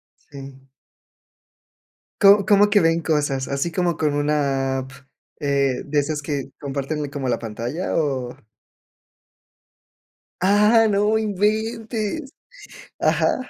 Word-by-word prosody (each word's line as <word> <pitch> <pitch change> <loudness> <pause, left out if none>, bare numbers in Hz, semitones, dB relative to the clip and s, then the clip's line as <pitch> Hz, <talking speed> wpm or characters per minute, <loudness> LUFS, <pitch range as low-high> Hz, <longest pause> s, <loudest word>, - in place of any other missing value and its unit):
Sí. 135 -1 -13 1.5
¿Co 200 0 +7
Cómo 205 0 +4
que 205 - +5
ven 165 0 +2
cosas? 145 -4 -1
¿Así 140 +5 -2
como 175 -2 0
con 150 -2 -1
una 140 -3 0
app, 130 0 -8 0.5
eh, 140 -2 0
de 145 0 0
esas 150 +1 -2
que 145 -2 -3
comparten 145 +1 -4
como 140 -3 -3
la 120 - +1
pantalla, 120 - -4
o? 135 -6 -2 2.0
¡Ah, 210 +4 +4
no 210 +2 +2
inventes! 220 - -2 0.7
Ajá. - - +2
150 Hz, 105 wpm, -22 LUFS, 140-205 Hz, 2.0 s, Co